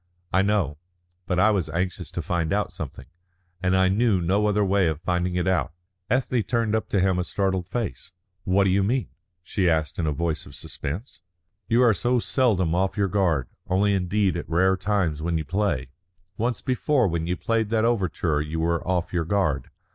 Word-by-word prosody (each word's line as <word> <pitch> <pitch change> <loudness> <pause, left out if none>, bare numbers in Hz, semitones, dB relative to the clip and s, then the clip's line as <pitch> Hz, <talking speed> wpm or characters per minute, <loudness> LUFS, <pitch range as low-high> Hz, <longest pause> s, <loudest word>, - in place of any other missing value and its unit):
"I 95 - +5
know. 95 -8 0 0.5
But 90 - 0
I 105 +4 +5
was 95 -7 0
anxious 90 +1 -2
to 85 - -3
find 85 -1 -1
out 105 +1 0
something, 65 - -7 0.6
and 95 0 +2
I 95 0 +4
knew 105 +1 +2
no 95 +5 +1
other 105 0 +2
way 95 -1 +3
of 80 -2 -1
finding 90 +1 -1
it 90 0 0
out." 95 -2 +1 0.4
Ethne 125 -1 +1
turned 115 -1 0
up 110 - -1
to 100 - +1
him 95 -1 +2
a - - +1
startled 95 -2 -1
face. 95 - -4 0.3
"What 95 +1 +3
do 95 - +2
you 100 +2 +3
mean?" 115 +1 0 0.3
she 90 +1 +1
asked 80 0 0
in 80 - 0
a - - +1
voice 80 0 -2
of 70 - -11
suspense. 90 - -6 0.5
"You 120 +2 +4
are 115 -3 +5
so 120 +7 +1
seldom 110 - +1
off 95 +3 0
your 100 -1 +1
guard. 85 -10 +1 0.2
Only 100 +2 +2
indeed 95 +1 +1
at 85 - -6
rare 95 +3 +3
times 95 -5 0
when 85 +1 0
you 80 - -3
play. 95 -11 -1 0.4
Once 120 +2 -2
before 130 -1 +2
when 85 -1 -2
you 90 0 -1
played 115 -2 0
that 110 0 +2
overture 90 -9 0
you 75 +2 -3
were 85 0 0
off 90 -1 -1
your 85 -2 0
guard. 80 -8 0
95 Hz, 200 wpm, -25 LUFS, 85-105 Hz, 0.6 s, I